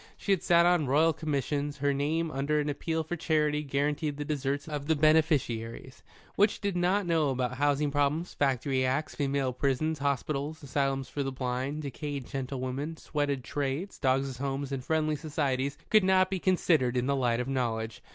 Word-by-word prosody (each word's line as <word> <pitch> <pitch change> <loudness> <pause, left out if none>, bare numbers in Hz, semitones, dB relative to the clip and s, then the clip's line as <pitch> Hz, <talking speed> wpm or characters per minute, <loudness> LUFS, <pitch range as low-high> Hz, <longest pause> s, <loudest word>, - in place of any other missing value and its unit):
She 200 - -2
had 190 - +3
sat 170 0 +5
on 175 -5 +3
Royal 155 +5 +4
Commissions. 145 -1 -2
Her 140 0 +1
name 155 +4 0
under 140 +2 0
an 150 0 -1
appeal 160 +3 -2
for 165 +3 -4
charity 150 -2 +1
guaranteed 145 +1 -1
the 145 - -4
deserts 140 -1 -2
of 145 -2 -4
the 160 - +3
beneficiaries. 145 -6 +1 0.3
What 205 +2 +5
she - - -7
did 200 -2 -2
not 180 +3 +2
know 165 -4 +2
about 125 -1 -1
housing 145 +1 +1
problems, 145 +4 0
factory 135 -1 +1
acts, 130 +4 0
female 140 -2 0
prisons, 140 +4 0
hospitals, 145 +2 -2
asylums 135 -1 -1
for 145 - -4
the 135 -1 -2
blind, 130 +3 -3
decayed 140 -1 -5
gentlewomen, 135 +4 -4
sweated 145 -5 -2
trades, 145 +8 -3
dogs' 130 -1 0
homes 140 0 -3
and 135 -2 -3
Friendly 155 +1 +1
Societies 140 -3 -1
could 215 -2 +6
not 185 0 +3
be 190 - -1
considered 160 -9 +2
in 125 - +1
the 140 +1 +1
light 120 -3 +1
of 125 - -2
knowledge. 120 -3 -2
145 Hz, 180 wpm, -29 LUFS, 135-155 Hz, 0.3 s, could